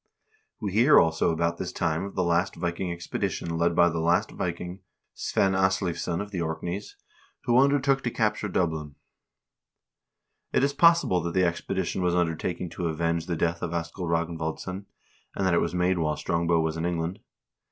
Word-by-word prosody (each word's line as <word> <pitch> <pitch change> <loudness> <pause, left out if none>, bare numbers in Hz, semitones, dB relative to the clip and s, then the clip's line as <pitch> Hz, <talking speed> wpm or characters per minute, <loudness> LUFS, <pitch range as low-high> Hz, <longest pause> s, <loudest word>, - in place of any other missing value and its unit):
We 105 -4 -3
hear 120 +9 +6
also 80 0 +2
about 85 +1 -1
this 90 -1 -3
time 80 -1 -1
of 100 - -8
the 95 - +1
last 85 +2 +1
Viking 85 +1 -2
expedition 85 -1 -3
led 85 0 +2
by 85 -1 +6
the 85 -1 -1
last 85 +2 +2
Viking, 90 +1 -4 0.3
Svein 95 0 +1
Asleivsson 95 -2 0
of 100 0 -7
the 90 -4 -2
Orkneys, 85 +4 -4 0.5
who 120 +1 +4
undertook 140 0 +3
to 120 - -1
capture 105 -2 0
Dublin. 80 -6 -1 1.6
It - - +3
is 140 0 +2
possible 165 - +4
that 85 +1 -4
the 95 -1 +4
expedition 90 +2 -2
was 90 -1 +1
undertaken 85 +1 -1
to 85 - -3
avenge 85 +1 -1
the 85 - -1
death 85 +1 -1
of 85 - -3
Askell 85 +2 -4
Ragnvaldsson, 85 +3 -2 0.5
and 95 - -1
that 95 - +3
it 85 - +3
was 85 +1 -2
made 90 0 +2
while 75 -2 0
Strong 85 -1 -1
bow 85 -1 +3
was 80 0 -1
in 80 - -2
England. 85 +1 -2
85 Hz, 175 wpm, -27 LUFS, 85-95 Hz, 1.6 s, hear